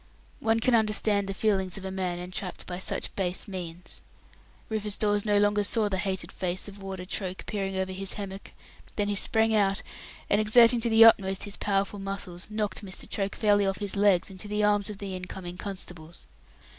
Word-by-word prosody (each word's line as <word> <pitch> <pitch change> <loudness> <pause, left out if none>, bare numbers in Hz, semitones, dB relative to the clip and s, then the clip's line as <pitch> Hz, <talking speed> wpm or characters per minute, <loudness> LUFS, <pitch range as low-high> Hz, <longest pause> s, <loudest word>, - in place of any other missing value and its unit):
One 225 0 +2
can 250 +2 +2
understand 215 -2 +3
the 195 - -3
feelings 195 -4 0
of 195 - -8
a 190 - -4
man 185 -2 -2
entrapped 180 +1 -6
by 180 0 -5
such - - -2
base 185 0 -1
means. 180 -2 -7 0.7
Rufus 210 -2 -2
Dawes 205 -1 +1
no 205 -1 +3
sooner 205 0 +3
saw 210 0 +2
the 190 -1 -1
hated 190 -3 -3
face 185 +1 -2
of 200 0 -11
Warder 190 -1 -6
Troke 185 0 -4
peering 195 -2 -3
over 190 0 -1
his 195 +1 -5
hammock, 195 -1 -7 0.4
then 205 -1 0
he - - +1
sprang 220 +2 +2
out, 195 -2 +2 0.4
and 205 - +3
exerting 235 +2 +6
to 235 +1 +1
the 225 0 +8
utmost 195 -4 +4
his 205 -1 -5
powerful 200 0 -1
muscles, 195 -2 -4
knocked 210 -1 -2
Mr. 190 -2 -5
Troke 200 -1 -2
fairly 205 -2 +3
off 195 - -1
his 205 -1 -3
legs 200 -2 +3
into 190 +2 -6
the 210 0 0
arms 205 -1 +2
of 210 - -6
the 195 -2 -5
in 185 0 -6
coming 180 -1 -7
constables. 180 -4 -7
200 Hz, 195 wpm, -28 LUFS, 190-210 Hz, 0.7 s, the